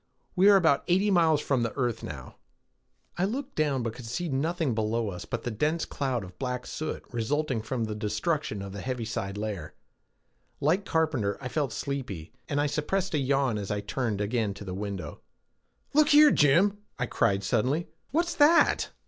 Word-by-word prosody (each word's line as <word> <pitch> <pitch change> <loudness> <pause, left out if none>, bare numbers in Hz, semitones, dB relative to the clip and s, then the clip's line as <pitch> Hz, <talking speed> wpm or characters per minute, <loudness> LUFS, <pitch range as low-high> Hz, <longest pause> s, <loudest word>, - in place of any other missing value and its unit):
We 190 +2 +6
are 205 - +8
about 160 -7 +4
eighty 190 +4 +3
miles 160 -5 +4
from 135 -4 +1
the 115 - -1
earth 120 -4 0
now." 70 -4 -8 0.8
I 185 - +3
looked 270 +6 -4
down, 145 -5 0
but 115 -1 -2
could 120 -1 -9
see 170 +9 -3
nothing 155 +1 0
below 110 0 0
us 90 -1 -7
but - - -4
the 120 - -2
dense 150 +9 0
cloud 130 -5 -2
of 90 -1 -12
black 125 -2 -3
soot 155 - -4
resulting 130 +1 -1
from 115 +2 -3
the 110 -1 -2
destruction 105 - -2
of 100 - -7
the 100 0 -6
heaviside 110 -5 -3
layer. 105 -7 -5 0.8
Like 175 +8 +1
Carpenter, 145 - 0
I 125 - -5
felt 145 -4 -1
sleepy, 125 - -5 0.2
and 145 -1 0
I 145 - +2
suppressed 175 +6 -1
a 150 - +2
yawn 135 -4 +1
as 100 - -5
I 105 - -1
turned 105 -1 -2
again 105 -1 -1
to 100 - -9
the 90 - -5
window. 100 -1 -5 0.7
"Look 300 +1 +5
here, 295 0 +8
Jim!" 180 +8 +4 0.2
I 120 - 0
cried 100 -4 +1
suddenly. 130 - +1 0.2
"What's 340 +4 0
that?" 315 +3 +4
130 Hz, 180 wpm, -28 LUFS, 110-160 Hz, 0.8 s, are